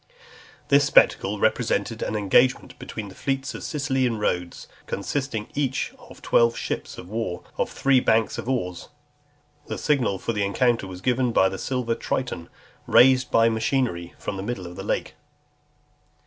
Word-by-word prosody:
This 140 +1 +6
spectacle 135 - +4
represented - - 0
an 110 - -2
engagement 115 +5 +2
between 105 -3 -7
the - - -12
fleets 135 +5 -2
of - - -7
Sicily 135 -3 0
and 115 -3 -2
Rhodes; 90 -4 -2 0.2
consisting 115 +1 -3
each 135 -3 -1
of - - -15
twelve 115 0 +3
ships - - -4
of 90 - -9
war, 105 -4 -4
of - - -1
three 135 -1 +3
banks 110 -2 +1
of 120 - -5
oars. 90 -9 -3 0.8
The - - -4
signal 130 -10 +1
for 115 - -3
the 105 -2 0
encounter 115 +2 +1
was 90 -1 -9
given 125 +1 +1
by 95 -4 +4
a 95 - -5
silver 125 -3 -1
Triton, 115 -7 -3 0.4
raised 130 0 +5
by 115 0 +4
machinery 110 -6 -1
from 100 - -5
the - - -4
middle 100 -4 -4
of 90 0 -9
the - - -6
lake. - - -2
115 Hz, 160 wpm, -24 LUFS, 100-130 Hz, 0.8 s, This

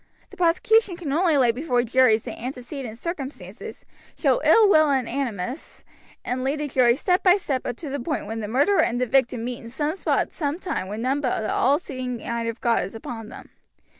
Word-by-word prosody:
The - - -12
prosecution 365 +3 +2
can 330 -6 -5
only 330 -1 +3
lay 250 -3 +4
before 245 -1 0
juries 235 -2 +3
the - - -6
antecedent 250 -1 -7
circumstances, 295 -2 -7 0.3
show - - +2
ill 445 -2 +6
will 310 -6 +5
and 265 -4 +1
animus, 245 - -4 0.4
and 255 +1 -2
lead 275 +3 -1
the 300 - -2
jury 250 -3 +3
step 360 +6 +1
by 365 +1 +5
step 275 -9 -3
up 245 - -3
to 305 - -7
the 285 - -3
point 295 +5 -3
when 225 +2 -5
the 210 - -4
murderer 285 - +3
and 245 +1 0
the 250 - +1
victim 250 -2 +1
meet 245 0 -4
in 230 - -10
some 295 +5 -2
spot 385 - 0
at - - -6
some 295 -2 -2
time 360 - -4
when 210 +4 -5
none 270 +3 0
but 250 -5 -1
the 215 - -2
all 275 +3 +3
seeing 255 -6 -5
eye 235 0 -3
of 230 0 -4
God 235 -2 +2
is 195 +4 -7
upon 225 -1 -7
them. - - -12
260 Hz, 220 wpm, -24 LUFS, 235-305 Hz, 0.4 s, ill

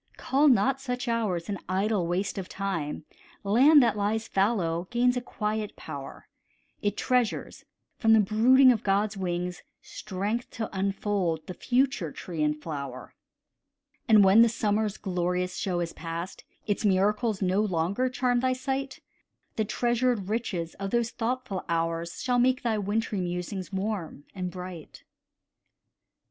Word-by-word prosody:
Call 280 +3 +2
not 265 +2 +3
such 250 -1 -3
hours 210 -8 -1
an 200 -3 -3
idle 190 -1 +1
waste 185 +3 -1
of 185 - -7
time, 165 -7 -3 0.4
Land 265 +8 +6
that 230 -3 +2
lies 215 +2 -1
fallow 185 -4 0
gains 245 +1 +2
a 250 - -1
quiet 215 -2 -3
power; 140 -3 -8 0.5
It 205 0 -1
treasures, 250 -3 -1 0.3
from 225 -1 +5
the 220 - +7
brooding 245 +6 +6
of 225 -4 0
God's 205 +1 +1
wings, 180 -1 -3 0.2
Strength 210 +4 -4
to 220 -3 -5
unfold 190 -4 -1
the 185 - -6
future 245 - 0
tree 165 0 -6
and 150 0 +1
flower. 140 -5 -6 0.9
And 215 -2 +7
when 195 +4 +7
the 235 - +6
summer's 215 -2 0
glorious 180 -1 -1
show 180 -3 -1
is 170 -1 -3
past, 170 +2 -6 0.2
Its 205 0 -1
miracles 210 +2 +2
no 185 +2 +2
longer 200 +5 0
charm 250 -1 +1
thy 255 +1 +1
sight, 265 +1 -3 0.5
The 220 - 0
treasured 240 -3 0
riches 190 -7 -2
of 195 0 -3
those 235 +1 0
thoughtful 240 -4 -3
hours 165 0 -1
Shall 250 -1 +2
make 255 +1 +2
thy 225 -3 0
wintry 205 0 -1
musings 180 +2 -4
warm 190 -6 -3
and 185 -2 -3
bright. 180 -3 -9
205 Hz, 145 wpm, -27 LUFS, 180-235 Hz, 0.9 s, the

